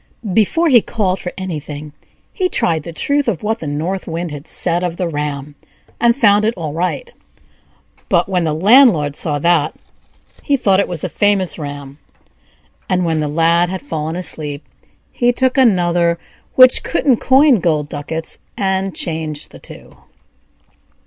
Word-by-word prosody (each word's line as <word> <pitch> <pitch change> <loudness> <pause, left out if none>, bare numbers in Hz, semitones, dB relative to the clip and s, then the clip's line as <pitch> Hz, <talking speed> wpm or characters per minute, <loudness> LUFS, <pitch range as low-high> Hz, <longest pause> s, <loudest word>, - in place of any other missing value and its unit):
Before 225 - +2
he 250 -7 +6
called 195 -5 -1
for 180 - -5
anything, 150 -5 -6 0.4
he 370 -3 0
tried 165 - 0
the 170 - -8
truth 285 - 0
of 200 -7 -2
what 220 +2 -1
the 160 - -6
North 165 +7 -3
Wind 170 0 -4
had 145 +1 -8
said 175 0 0
of 175 -1 -3
the 180 - -1
ram, 145 -2 -4 0.5
and 235 0 +3
found 210 -5 +4
it 225 +2 0
all 155 -4 -4
right; 180 - -3 1.0
but, - - +2
when 185 -3 0
the 155 -2 -1
landlord 185 - +5
saw 150 -2 -2
that, 160 0 +1 0.7
he 285 -2 +1
thought 195 -6 +2
it 200 - +1
was 175 -4 -5
a - - 0
famous 195 -1 0
ram, 145 -1 -8 0.9
and, 180 -2 +1
when 160 -1 0
the 150 - -1
Lad 165 +3 +2
had 190 +5 -5
fallen 160 - -4
asleep, 155 -5 -5 0.5
he 245 0 +2
took 260 +2 0
another 175 -9 +2 0.4
which 255 0 +7
couldn't 275 -7 +1
coin 265 -1 +4
gold 155 -4 0
ducats, 160 +3 -4 0.2
and 190 -1 -1
changed 155 -3 -3
the - - -13
two. - - -11
175 Hz, 160 wpm, -17 LUFS, 155-215 Hz, 1.0 s, which